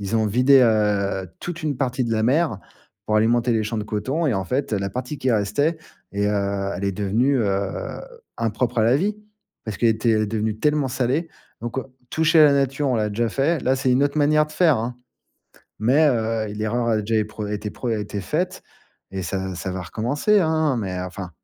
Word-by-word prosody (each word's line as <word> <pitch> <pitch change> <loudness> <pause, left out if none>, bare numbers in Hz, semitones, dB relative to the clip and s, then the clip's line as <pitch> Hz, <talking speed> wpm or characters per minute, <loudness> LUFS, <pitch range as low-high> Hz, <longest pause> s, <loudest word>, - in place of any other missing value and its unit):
Ils 100 +3 -1
ont 110 -1 +2
vidé, 125 +6 +5
heu, 105 -4 +1
toute 175 -1 -6
une 150 -3 -1
partie 130 -1 -1
de 115 - -2
la 110 -1 +1
mer, 135 - +2 0.5
pour 105 - 0
alimenter 120 +2 +3
les 110 -1 +1
champs 110 +1 -3
de 105 - -3
coton. 130 +11 -1
Et, 130 - +1
en 95 -1 -1
fait, 130 +6 -2
heu, 105 - +1
la 100 0 -2
partie 125 +6 -5
qui 130 - 0
restait 110 +10 +1 0.4
et, 100 0 0
heu, 100 -1 -1
elle 95 - -4
est 100 - 0
devenue, 105 +8 +1
heu, 100 -3 -2 0.4
impropre 115 +2 -1
à - - +4
la 120 +4 +4
vie. 205 +7 -1 0.5
Parce 110 -2 -4
qu'elle 115 - +3
était, 110 +1 +1
elle 110 -1 +3
est - - 0
devenue 110 0 -2
tellement 150 +2 +1
salée. 130 +6 -1 0.3
Donc, 120 +3 -4
heu, 130 - -3 0.3
toucher 160 0 +4
la 150 -2 +7
nature, 140 +1 +1
on 125 - +1
l'a 105 -1 0
déjà 115 +3 0
fait. 140 +8 +1
Là, 130 +1 +1
c'est 130 -1 0
une 130 +2 +3
autre 145 +1 +1
manière 150 +1 +3
de 155 - -13
faire, 160 -4 +3
hein, 120 +2 -4 0.8
mais, 135 +8 +4
heu, 115 -3 0
l'erreur 110 +3 -1
a 115 - +2
déjà 110 +2 -2
é - - 0
pre 105 0 -6
été 105 0 -3
pre 125 - -4
été 105 -2 -3
faite, 180 - -2 0.5
et 95 -1 -4
ça 95 +1 -3
ça 95 +2 -4
va 95 0 -4
recommencer, 135 - +1
hein. 160 -5 +1
Mais 95 -5 -3
enfin, 90 0 -6
115 Hz, 220 wpm, -22 LUFS, 105-140 Hz, 0.8 s, la